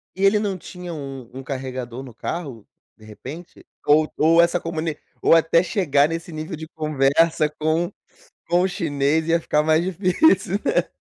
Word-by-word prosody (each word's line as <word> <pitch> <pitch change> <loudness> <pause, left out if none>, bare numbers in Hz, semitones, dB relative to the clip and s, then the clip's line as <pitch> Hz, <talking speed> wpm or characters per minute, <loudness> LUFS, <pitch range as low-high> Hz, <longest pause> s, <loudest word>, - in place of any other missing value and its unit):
E 190 - -3
ele 205 +1 +4
não 200 -3 -2
tinha 180 0 -8
um 135 -5 -7
um 135 +1 -8
carregador 130 -2 -5
no 125 -4 -11
carro, 130 - -6 0.3
de 110 - -17
repente? 140 +11 -11 0.2
Ou 155 +1 +4
ou 165 +2 +5
essa 170 +1 +2
comuni 160 -2 -3 0.2
ou - - +5
até 165 +1 +4
chegar 150 -7 +2
nesse 165 +1 -5
nível 155 +2 -5
de 160 +1 -8
conversa 155 +1 +1
com 160 +4 -1 0.6
com 175 +1 +3
o 185 - +2
chinês 160 -4 0
ia 165 0 +3
ficar 150 -1 +1
mais 160 +2 +3
difícil, 190 - +2
né? - - +1
160 Hz, 170 wpm, -22 LUFS, 140-175 Hz, 0.6 s, ou